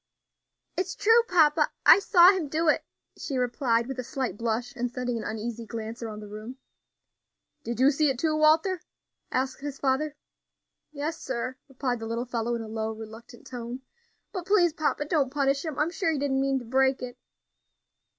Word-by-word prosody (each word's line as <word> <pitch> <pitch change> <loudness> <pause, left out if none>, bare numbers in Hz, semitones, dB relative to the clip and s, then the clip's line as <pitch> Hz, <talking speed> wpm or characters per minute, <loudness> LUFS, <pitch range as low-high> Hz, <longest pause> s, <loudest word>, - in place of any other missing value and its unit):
"It 370 - 0
is - - -6
true, 450 +3 +5
papa, 310 -3 +4 0.2
I - - +9
saw 365 -2 +7
him 370 -6 -2
do 320 +3 0
it," 305 - +3 0.4
she 275 - -3
replied, 240 -1 +1
with 265 0 -6
a - - -2
slight 260 -4 -3
blush, 235 +4 -2
and 245 -1 -2
sending 245 0 -3
an 225 - -3
uneasy 225 +1 -5
glance 225 +1 -6
around 215 -2 -6
the 210 - -9
room. 215 +5 -8 1.1
"Did 235 0 -4
you 265 +2 +6
see 300 +1 +2
it, 265 - -1
too, 310 +3 +1
Walter?" 320 +4 +3 0.5
asked 260 +1 -1
his 285 -1 -5
father. 280 +2 0 0.8
"Yes, 310 +2 -4
sir," 255 0 -3
replied 255 -2 -2
the 225 - -5
little 230 +2 -2
fellow, 235 -1 -2
in 230 - -4
a - - -8
low, 220 0 -3
reluctant 225 +2 -11
tone; 245 +1 -7 0.5
"but 365 -3 -5
please, 360 -5 +4
papa, 300 -2 -1
don't 295 -4 +1
punish 275 0 +1
him. 315 -4 -5
I'm 310 +3 +1
sure 350 -2 0
he 310 - -1
didn't 270 -1 0
mean 270 0 +1
to 250 - -6
break 265 +2 +2
it." 250 0 -7
265 Hz, 190 wpm, -27 LUFS, 235-305 Hz, 1.1 s, I